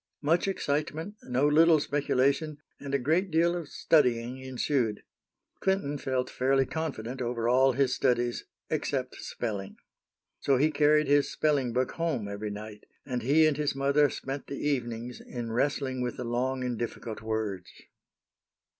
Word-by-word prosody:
Much 165 +6 +2
excitement, 155 +1 -2
no 130 +3 +2
little 160 +2 +6
speculation, 145 +1 +1 0.2
and 140 -1 -3
a - - +5
great 160 +9 +1
deal 170 +1 +3
of 170 -4 -5
studying 125 -4 +2
ensued. 130 -3 -1 0.6
Clinton 190 -7 0
felt 130 -1 -1
fairly 135 +1 +2
confident 130 -6 -4
over 120 -1 -1
all 130 +2 +4
his 135 0 +2
studies 120 -1 0 0.2
except 135 -4 -2
spelling. 100 -5 -5 0.6
So 135 -2 +2
he 150 +4 +3
carried 150 0 +4
his 145 0 +3
spelling 140 -5 +1
book 125 +2 0
home 155 -11 -2
every 100 +1 -4
night, 105 +1 -8 0.2
and 125 -3 -2
he 150 +6 +4
and 155 -2 +2
his 150 -2 0
mother 140 +1 +3
spent 135 +2 -5
the 140 - -5
evenings 120 -4 -2
in 120 -2 -5
wrestling 130 +1 0
with 125 -1 -3
the 125 - -4
long 130 +2 -1
and 125 -2 -2
difficult 115 -2 -5
words. 110 -5 -3
135 Hz, 150 wpm, -29 LUFS, 120-150 Hz, 0.6 s, little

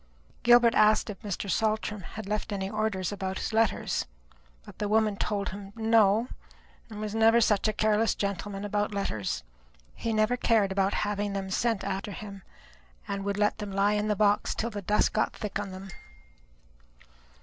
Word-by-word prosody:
Gilbert 240 -1 +6
asked 215 0 +4
if 200 - -12
Mr. 205 -2 -4
Saltram 215 0 0
had 205 +4 -8
left 210 +1 -2
any 195 -1 -2
orders 215 -3 -1
about 190 -1 -3
his - - -4
letters; 225 0 +1 0.6
but - - -13
the 210 - -1
woman 215 0 +2
told 200 0 -2
him, 195 0 -8
no; 225 0 +3 0.6
there 215 - -9 0.2
never 225 +1 +5
was 235 - +5
such 210 0 +2
a - - +2
careless 215 +1 +2
gentleman 200 0 -3
about 205 0 -1
letters. 110 - -2 0.5
He 230 - -3
never 215 +3 +2
cared 220 -5 +2
about 195 0 +1
having 205 -1 -2
them 195 -1 -4
sent 225 0 0
after 195 +1 -3
him, 200 -1 -8 0.7
and 200 0 -3
would 200 0 -2
let 210 0 +1
them 205 -2 -5
lie 200 +2 +2
in 210 0 0
the 210 - +1
box 205 0 +2
till 230 +1 -2
the 205 -1 -5
dust 210 +3 +2
got - - +1
thick 210 -2 -4
upon 205 - -4
them. 190 +1 -9
210 Hz, 175 wpm, -28 LUFS, 195-220 Hz, 0.7 s, Gilbert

